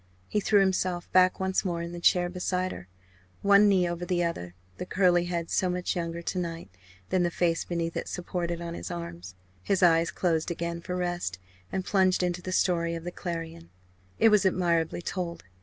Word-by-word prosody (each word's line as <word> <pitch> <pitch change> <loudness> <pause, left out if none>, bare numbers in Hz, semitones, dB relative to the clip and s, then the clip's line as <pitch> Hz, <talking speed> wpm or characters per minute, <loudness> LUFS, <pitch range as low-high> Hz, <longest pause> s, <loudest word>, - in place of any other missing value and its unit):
He 210 - 0
threw 205 0 +4
himself 185 -2 0
back 185 0 +4
once 190 0 0
more 170 -3 -2
in 170 - -6
the 175 - -6
chair 175 +1 +4
beside 180 +1 -2
her 90 - -9 0.6
one 200 +1 +6
knee 185 -3 +3
over 175 0 -4
the 175 0 0
other, 90 - -3 0.2
the - - -3
curly 180 -2 +3
head 170 -1 -3
so 185 - +2
much 180 0 -1
younger 170 -1 -3
to 180 - -2
night 165 - -5 0.4
than 185 - +2
the 175 - +2
face 170 -1 0
beneath 170 -1 -2
it - - -3
supported 175 -1 -3
on 170 0 -5
his 90 - -6
arms, 85 +2 -7 0.3
his 190 - +1
eyes 165 -1 +5
closed 165 -3 0
again 170 0 -3
for 180 +1 -4
rest 175 - -2 0.3
and 190 -1 -2
plunged 185 -2 +3
into 180 0 -1
the 185 - -5
story 170 -2 +1
of 165 - -6
the 175 - -4
Clarion. 165 - -6 0.5
It 225 - +6
was 210 -1 +4
admirably 175 -3 +1
told. 175 -2 -4
175 Hz, 195 wpm, -28 LUFS, 170-185 Hz, 0.6 s, one